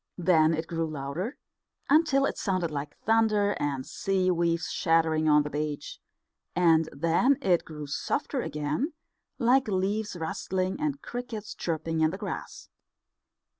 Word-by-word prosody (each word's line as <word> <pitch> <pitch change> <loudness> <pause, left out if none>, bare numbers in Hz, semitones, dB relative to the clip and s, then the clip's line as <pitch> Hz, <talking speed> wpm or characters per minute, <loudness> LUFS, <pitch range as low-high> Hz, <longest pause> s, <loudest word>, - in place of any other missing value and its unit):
Then 165 -3 +4
it 160 +1 -3
grew 165 0 -2
louder, 155 - -4 0.5
until 285 -2 +4
it - - -1
sounded 185 -5 -1
like 145 0 -5
thunder 215 -2 +3
and 140 -3 -2
sea 190 -1 0
waves 170 -1 0
shattering 160 -1 +2
on 150 0 +5
the 150 - -4
beach; 150 -1 -4 0.6
and 165 -2 +4
then 170 - +2
it 180 -10 +2
grew 150 -2 -7
softer 255 - -2
again, 150 - -2 0.4
like 260 +1 +3
leaves 205 +1 -1
rustling, 185 - -2
and 290 -2 -2
crickets 235 -4 -6
chirping 160 -1 -2
in 155 - +4
the 185 - -5
grass. - - -6
170 Hz, 135 wpm, -28 LUFS, 155-215 Hz, 0.6 s, on